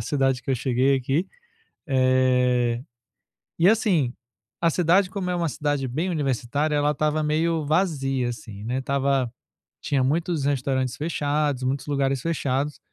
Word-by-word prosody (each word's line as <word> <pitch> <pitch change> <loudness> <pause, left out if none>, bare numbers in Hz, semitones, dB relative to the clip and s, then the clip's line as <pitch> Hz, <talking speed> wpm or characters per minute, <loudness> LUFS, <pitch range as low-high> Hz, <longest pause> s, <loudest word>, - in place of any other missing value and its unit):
cidade 135 +1 0
que - - -4
eu - - +3
cheguei 130 +2 +2
aqui... 135 +7 0 0.6
Eh, 125 -2 +2 0.8
e 170 - +5
assim, 190 - +2 0.5
a 170 - +4
cidade, 180 +3 +3
como 190 -2 -3
é 180 - 0
uma 170 -1 0
cidade 145 -2 -1
bem 160 +9 -2
universitária, 145 -1 -1
ela 145 0 +2
estava 150 +1 0
meio 160 +1 0
vazia, 140 -6 0
assim, 110 -4 -8
né. 125 +4 -2
Estava 135 -2 0 0.5
tinha 135 -2 0
muitos 160 +2 0
restaurantes 130 -2 0
fechados, 145 -3 -1
muitos 130 +1 -1
lugares 135 -2 0
fechados, 145 -2 -1
140 Hz, 140 wpm, -24 LUFS, 130-155 Hz, 0.8 s, e